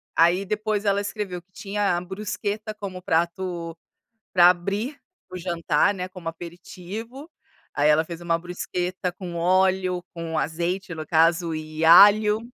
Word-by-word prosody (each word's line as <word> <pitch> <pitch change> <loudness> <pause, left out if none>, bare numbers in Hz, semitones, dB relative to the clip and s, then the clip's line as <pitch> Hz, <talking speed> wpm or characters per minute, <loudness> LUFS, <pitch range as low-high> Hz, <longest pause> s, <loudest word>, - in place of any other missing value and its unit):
Aí 175 +4 +4
depois 210 +1 -2
ela 200 0 +2
escreveu 200 -3 -5
que 185 - -45
tinha 200 -1 -1
a - - -3
bruschetta 205 +3 -4
como 195 -3 -7
prato 170 0 -2 0.6
para 175 -1 +7
abrir 200 - -2 0.3
o 185 - -7
jantar, 170 +1 +1
né, 180 -1 -5
como 185 -3 -8
aperitivo. 185 - -9 0.5
Aí, 145 +1 +3
ela 150 +1 +4
fez 170 0 -8
uma 170 -1 0
bruschetta 180 +1 -4
com 180 -1 -8
óleo, 185 +1 +2
com 165 -1 -3
azeite, 175 +4 -2
no 155 -1 -6
caso, 165 0 +2
e 155 0 -4
alho. 210 +5 +7
180 Hz, 145 wpm, -24 LUFS, 170-200 Hz, 0.6 s, para